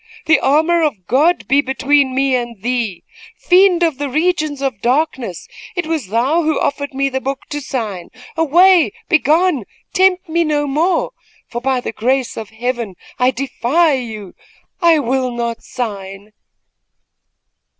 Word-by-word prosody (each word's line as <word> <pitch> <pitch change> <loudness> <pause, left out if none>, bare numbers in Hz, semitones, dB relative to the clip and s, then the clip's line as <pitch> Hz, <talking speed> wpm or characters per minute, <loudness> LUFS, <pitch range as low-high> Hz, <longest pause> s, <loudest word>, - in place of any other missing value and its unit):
The 315 - +4
armor 320 +5 +2
of 255 - -1
God 300 - +2
be 275 +3 +4
between 265 0 +1
me 270 0 +1
and 240 -3 -4
thee! 235 -7 -2 0.3
Fiend 360 -1 +4
of 320 -5 0
the 290 -1 -2
regions 310 -1 0
of 265 -7 -3
darkness, 255 - -1 0.3
it 360 -2 -2
was 315 - -2
thou 250 - +1
who 315 -2 0
offered 285 0 -2
me 275 +1 +1
the 265 -1 -3
book 270 +1 -3
to 295 0 -4
sign. 215 -10 -4 0.3
Away! 340 +3 +4 0.2
begone! 315 - +2 0.3
tempt 375 -1 +3
me 335 +1 +1
no 300 -2 0
more, 325 +6 0 0.4
for, 240 - -5
by 260 -1 0
the - - -4
grace 255 +3 -1
of 220 -2 -7
Heaven, 235 -3 -4 0.2
I 250 0 +4
defy 275 +5 +1
you! 220 -7 -5 0.5
I 335 -2 +5
will 260 -2 0
not 235 -1 -3
sign!" 200 -4 -6
270 Hz, 150 wpm, -17 LUFS, 240-315 Hz, 0.5 s, I